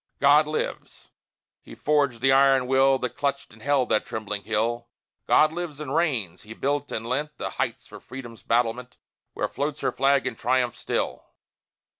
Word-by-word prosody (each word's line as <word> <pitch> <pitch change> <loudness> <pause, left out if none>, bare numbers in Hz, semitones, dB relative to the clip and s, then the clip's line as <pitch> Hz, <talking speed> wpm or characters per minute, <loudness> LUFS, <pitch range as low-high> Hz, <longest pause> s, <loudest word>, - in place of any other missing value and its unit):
God 145 +2 +5
lives! 155 - -5 0.5
He - - -12
forged 140 -6 +1
the 135 +1 +4
iron 135 -1 +5
will, 135 +1 +4
That 125 -2 -3
clutched 140 -4 -2
and 110 - -17
held 140 0 +1
that 110 - +2
trembling 105 -2 -5
hill! 115 +2 -1 0.4
God 155 +1 +5
lives 170 -4 -5
and 145 -3 -5
reigns! 125 - 0
He 110 +1 -11
built 145 +1 -1
and 110 - -4
lent 145 +5 -2
The - - -4
heights - - -3
for - - -12
Freedom's 120 -3 -10
battlement, 120 +1 -1 0.4
Where - - -1
floats 145 +1 -3
her - - +1
flag 135 0 +2
in 130 - -1
triumph 125 0 0
still! - - -3
135 Hz, 170 wpm, -25 LUFS, 120-145 Hz, 0.5 s, God